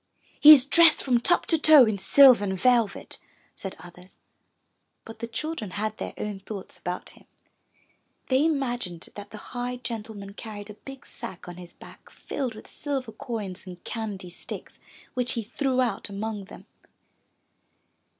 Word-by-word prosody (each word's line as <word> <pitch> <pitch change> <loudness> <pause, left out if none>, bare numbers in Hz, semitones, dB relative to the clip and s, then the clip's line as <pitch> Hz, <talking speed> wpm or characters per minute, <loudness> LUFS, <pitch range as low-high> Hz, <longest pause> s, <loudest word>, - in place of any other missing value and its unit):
'' - - -43 0.2
'*He 300 - +11
is 275 -4 +9
dressed 325 +2 +6
from 250 -3 +2
top 350 +9 +2
to 325 - +2
toe 300 -4 +8
in 215 -3 -1
silver 255 +3 +7
and 190 -2 -2
velvet," 235 -4 +1 0.4
said 195 - -7
others. 180 +1 -15 0.9
But 225 - -11
the 230 - -4
children 235 -1 -4
had 215 +1 -2
their - - -5
own 210 -2 -4
thoughts 195 0 -9
about 180 +1 -4
him. - - -20 1.0
They 260 +2 +3
imagined 245 - -2
that 205 0 -9
the 215 - -10 0.2
high 245 0 -3
gentleman 220 -4 -6
carried 210 -1 -8
a 210 - -18
big 270 -1 -10
sack 180 - -9
on 175 0 -8
his 175 -1 -12
back - - -15
filled 255 -6 -5
with 215 - -11
silver 270 -5 -4
coins 215 -5 -6
and 180 -1 -10
candy 205 -6 -5
sticks, - - -9 0.3
which 250 -1 0
he 230 - -3
threw 255 +3 0
out 235 -4 -2
among 205 0 -4
them. - - -13
225 Hz, 160 wpm, -26 LUFS, 200-255 Hz, 1.0 s, He